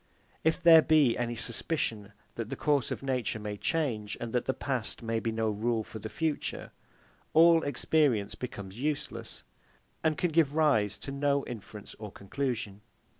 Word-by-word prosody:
If 160 +2 +2
there 165 -1 +9
be 150 -7 +4
any 120 -1 -2
suspicion 115 -3 -2 0.2
that 115 -2 -5
the 135 - -3
course 145 -2 +1
of - - -4
nature 130 -4 -1
may 105 -1 -5
change, 115 - -1
and 120 -1 -5
that 125 - +1
the 130 - 0
past 125 -3 -3
may 115 0 0
be 115 +1 -2
no 110 -1 0
rule 110 +2 0
for 110 - -9
the 110 - -6
future, 160 +2 -3 0.6
all 165 0 +7
experience 140 -6 +1
becomes 100 -4 -7
useless, 150 +2 -4 0.6
and 155 -2 +2
can 175 0 0
give 155 -3 +3
rise 110 -11 +3
to 135 - -6
no 140 0 +1
inference 105 -3 -9
or 105 -2 -7
conclusion. 110 -1 -4
120 Hz, 165 wpm, -30 LUFS, 110-150 Hz, 0.6 s, there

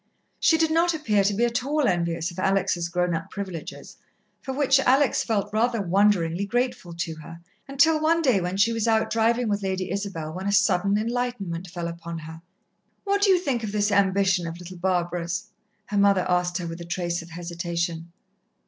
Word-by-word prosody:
She 325 - +4
did 320 0 +2
not 335 +1 +2
appear 215 -10 +1
to 200 +1 +1
be 235 +4 +2
at 240 +1 -1
all 295 +1 0
envious 170 -1 -1
of 175 - -9
Alex' 185 -2 +1
grown 180 0 0
up 165 0 -4
privileges, 190 -5 -7 0.4
for 265 - -5
which 270 0 +3
Alex 270 +1 +3
felt 210 -3 -1
rather 230 +1 +1
wonderingly 195 -1 +2
grateful 245 -6 -2
to 170 -1 -3
her, 165 +2 -11 0.3
until 305 +3 +3
one 330 +1 +2
day 245 -10 +3
when 180 +2 -3
she 225 +4 +3
was 225 0 -1
out 220 -1 +2
driving 230 +2 +2
with 205 -1 0
Lady 190 -1 -2
Isabel, 190 -6 -4
when 190 +3 -5
a - - +1
sudden 200 -1 +3
enlightenment 215 -6 -3
fell 175 -1 -5
upon 170 0 -6
her. 160 +1 -9 0.6
"What 400 0 0
do 405 - +4
you 375 - +6
think 275 -9 -2
of 210 - -3
this 210 0 +1
ambition 195 -2 +2
of 165 +1 -6
little 180 +1 -10
Barbara's?" 175 +1 -2 0.4
her 205 -1 -1
mother 200 -2 +4
asked 180 -1 +1
her, 180 - -4
with 165 +1 -6
a - - -7
trace 175 0 -2
of 165 - -12
hesitation. 170 0 -4
195 Hz, 195 wpm, -25 LUFS, 175-235 Hz, 0.6 s, you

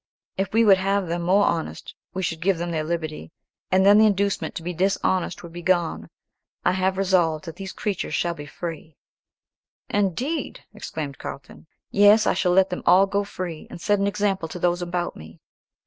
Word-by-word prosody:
If 195 +1 -2
we 225 +1 +4
would 195 -3 +6
have 195 +1 +1
them 170 +1 -2
more 190 +4 +3
honest, 165 -1 -3 0.2
we 190 - -4
should 160 -1 -3
give 190 0 +2
them 170 +1 -3
their 160 -2 -1
liberty, 155 - -4 0.4
and 190 +1 +3
then 205 +1 +7
the 220 - +7
inducement 200 -1 0
to 165 - -5
be 180 +1 -3
dishonest 185 -1 0
would 170 -1 -10
be 175 - -7
gone. 175 -2 0 0.6
I - - +4
have 190 +1 0
resolved 180 -4 +1
that 165 - -8
these 195 -1 -6
creatures 200 -3 -3
shall 175 - 0
all - - -6
be 145 0 -8
free." 160 -1 -7 0.9
"Indeed!" 240 - -1
exclaimed 155 -9 -6
Carlton. 135 +3 -9 0.2
"Yes, 205 +2 +6
I - - +3
shall 180 - +1
let 190 0 +4
them 180 - -3
all 190 +2 +7
go 200 +1 -1
free, 180 -5 -6
and - - -9
set 205 +3 +1
an 200 - +1
example 200 -4 -1
to 160 - -7
those 175 0 0
about 175 0 -3
me." 80 +1 -13
185 Hz, 195 wpm, -24 LUFS, 170-195 Hz, 0.9 s, then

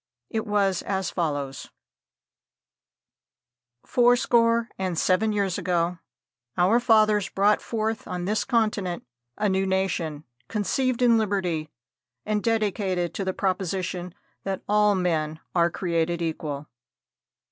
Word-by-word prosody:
It 220 -1 -2
was 200 -3 +1
as 190 -3 -2
follows: 145 -6 -3 2.2
"Four 245 0 +4
score 230 -1 +2
and 185 -3 -2
seven 200 +6 +2
years 200 -3 0
ago 175 -1 0 0.6
our 190 +7 +4
fathers 215 -4 +3
brought 205 +2 +2
forth 220 -1 -3
on 180 -1 -4
this 210 +3 0
continent 215 -7 0 0.3
a 210 - +1
new 190 0 +1
nation, 170 -5 -1 0.2
conceived 250 +4 0
in 235 -2 +5
Liberty, 180 -7 -1 0.6
and 210 0 0
dedicated 200 -6 0
to 195 - -3
the 190 - 0
proposition 185 -1 -2 0.3
that 195 -1 -3
all 210 0 +4
men 160 -4 -1
are 170 -1 +3
created 170 -1 -1
equal. 155 -3 -3
190 Hz, 115 wpm, -25 LUFS, 175-215 Hz, 2.2 s, in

